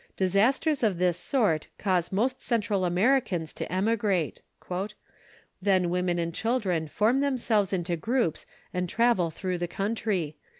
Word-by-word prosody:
Disasters 230 - +2
of 210 -6 +2
this 180 -1 +2
sort 200 - 0
cause 180 -4 0
most 250 +7 0
Central 210 -5 0
Americans 180 - +1
to - - -5
emigrate. 195 -3 0 1.2
"Then 185 -3 +2
women 180 -1 0
and 170 -1 -2
children 195 -8 0
form 220 - +2
themselves 240 -8 +1
into 175 -2 -1
groups 230 - -1 0.3
and 180 -1 -1
travel 230 -7 +2
through 180 +2 -3
the 175 - -1
country. 195 -5 -2
195 Hz, 130 wpm, -27 LUFS, 175-230 Hz, 1.2 s, Disasters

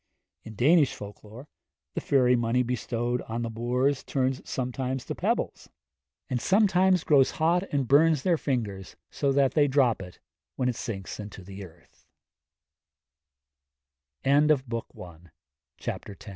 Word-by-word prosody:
In 110 -1 -10
Danish 145 - +4
folk 100 0 -10
lore, 115 +7 -12 0.5
the - - -3
fairy 125 -3 +3
money 120 +1 +1
bestowed 120 0 -2
on 115 +1 -2
the 115 - -4
boors 125 +4 0
turns 130 -1 -1
sometimes 130 0 -3
to - - -4
pebbles, - - -2 0.6
and 125 -2 -2
sometimes 190 -3 +3
grows 140 -3 +4
hot 175 +4 +1
and 140 -3 0
burns 150 +1 +4
their 180 -2 +3
fingers, 110 - -3 0.2
so 140 - 0
that 135 -1 +2
they 145 -2 +4
drop 130 -6 +2
it, 90 -1 -10 0.4
when 125 -1 0
it 125 - -2
sinks 95 -4 -6
into 105 -2 -8
the 100 +1 -9
earth. 85 -2 -17
125 Hz, 125 wpm, -27 LUFS, 115-145 Hz, 0.6 s, Danish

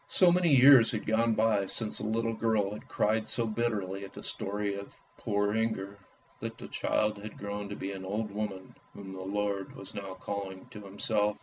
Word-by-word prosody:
So 180 -2 +5
many 175 -1 +3
years 130 -4 +8
had 110 - -3
gone 115 +1 +2
by 110 -3 +2
since 110 +1 -1
the - - -4
little 115 +1 0
girl 110 -3 +1
had 105 - -9
cried 110 +1 +1
so 115 +1 +3
bitterly 105 -4 -2
at 100 - -9
the - - -9
story 100 0 -2
of 100 0 -8
" - - -34
Poor 105 0 0
Inger," 105 -3 -1 0.4
that - - -5
the - - -8
child 105 -1 0
had 110 +1 -8
grown 100 0 -5
to 100 - -5
be 95 - -4
an 95 -1 -6
old 105 +3 -3
woman 100 -2 -5 0.2
whom 95 -1 -8
the 95 - -7
Lord 100 0 -2
was 95 - -8
now 95 -2 -6
calling 95 0 -5
to 105 - -9
Himself. 105 +1 0
105 Hz, 205 wpm, -30 LUFS, 100-110 Hz, 0.4 s, years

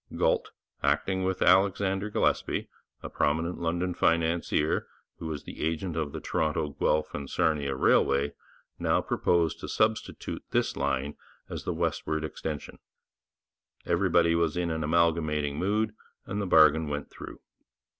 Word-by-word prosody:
Galt, - - +1 0.3
acting 95 -1 +1
with 95 0 0
Alexander 95 +2 +3
Gillespie, - - 0 0.4
a - - -4
prominent 80 +4 0
London 85 +2 -1
financier 85 -2 +1 0.3
who 80 - -5
was 75 -3 -5
the - - -9
agent 80 +2 -2
of 80 -3 -2
the - - -5
Toronto, 80 -1 -1
Guelph 75 +1 0
and 70 -1 -5
Sarnia 75 -3 0
Railway, 70 +1 +3 0.5
now - - +2
proposed 85 -2 +1
to - - -6
substitute 110 0 -1
this - - 0
line 70 +1 -1 0.3
as - - -5
the 90 - -1
westward 80 -2 -1
extension. 75 -1 -5 1.1
Everybody 85 -1 +3
was 85 0 +1
in 85 -1 0
an 80 -1 -2
amalgamating 80 -2 +1
mood, 105 +3 0 0.3
and 105 +1 -3
the 100 - -2
bargain 80 -2 +5
went 75 0 -4
through. - - -10
80 Hz, 135 wpm, -28 LUFS, 75-90 Hz, 1.1 s, bargain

